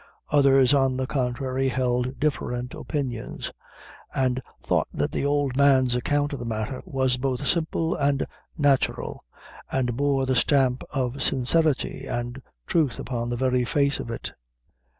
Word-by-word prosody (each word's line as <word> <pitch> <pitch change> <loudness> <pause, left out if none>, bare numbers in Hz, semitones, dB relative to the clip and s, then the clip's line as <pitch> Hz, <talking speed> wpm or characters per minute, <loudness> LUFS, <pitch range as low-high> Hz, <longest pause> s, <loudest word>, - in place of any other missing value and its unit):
Others, 135 -2 +5
on 135 -2 +3
the 130 - -1
contrary 130 0 -1
held 125 0 -1
different 125 -4 -1
opinions; 130 -7 -4 0.6
and 130 -1 +1 0.2
thought - - +1
that - - -1
the - - -2
old 140 -2 +1
man's 130 -3 +4
account 145 +4 0
of 140 - -4
the - - -5
matter 115 +3 -3
was 130 -1 +1
both 130 -1 -2
simple 165 0 +1
and 140 -1 +1 0.3
natural, 145 -3 +1 0.5
and 125 -3 0
bore 140 0 +1
the 130 0 +1
stamp 130 0 +3
of 130 -1 -2
sincerity 135 0 +1
and 120 +2 -4 0.2
truth 155 -7 +1
upon 120 -2 -3
the 120 - -2
very 125 0 +2
face 140 +3 +1
of - - -5
it. 115 - -5
130 Hz, 145 wpm, -25 LUFS, 125-140 Hz, 0.6 s, Others